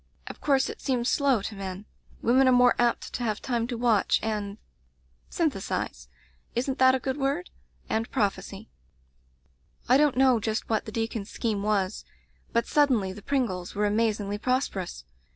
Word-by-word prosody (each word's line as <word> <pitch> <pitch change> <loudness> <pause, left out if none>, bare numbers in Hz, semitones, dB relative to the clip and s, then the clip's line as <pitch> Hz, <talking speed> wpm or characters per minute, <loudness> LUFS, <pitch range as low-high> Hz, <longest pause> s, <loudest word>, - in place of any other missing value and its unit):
Of - - -9
course 270 -2 +2
it - - -7
seems 250 -2 0
slow 270 -7 +2
to 215 - -4
men. 195 0 -6 0.4
Women 260 +3 +4
arc 255 - +5
more 245 0 +5
apt 240 -1 +1
to 245 - -3
have 215 -3 -1
time 235 -3 -1
to 245 -2 -4
watch 230 -4 +3
and 210 -2 -3 0.4
— - - -45 0.3
syn 65 - +1
thesize 65 0 -4 0.2
— - - -37
isn't 260 +2 -1
that 260 0 +6
a - - -1
good 265 +1 -3
word? 285 +6 -1 0.2
— - - -36
^and 225 +1 -1
prophesy. 200 0 -2 1.2
"I 255 - +6
don't 290 -3 +3
know 260 -3 +5
just 220 0 -2
what 220 - +1
the 215 - -7
deacon's 225 -2 -3
scheme 215 -4 -2
was, 200 -1 0 0.5
but 235 - +1
suddenly 250 -11 +2
the 205 - -10
Pringles 200 -9 -2
were 210 +1 +1
amazingly 210 -1 0
prosperous. 205 - -2
230 Hz, 175 wpm, -27 LUFS, 205-260 Hz, 1.2 s, that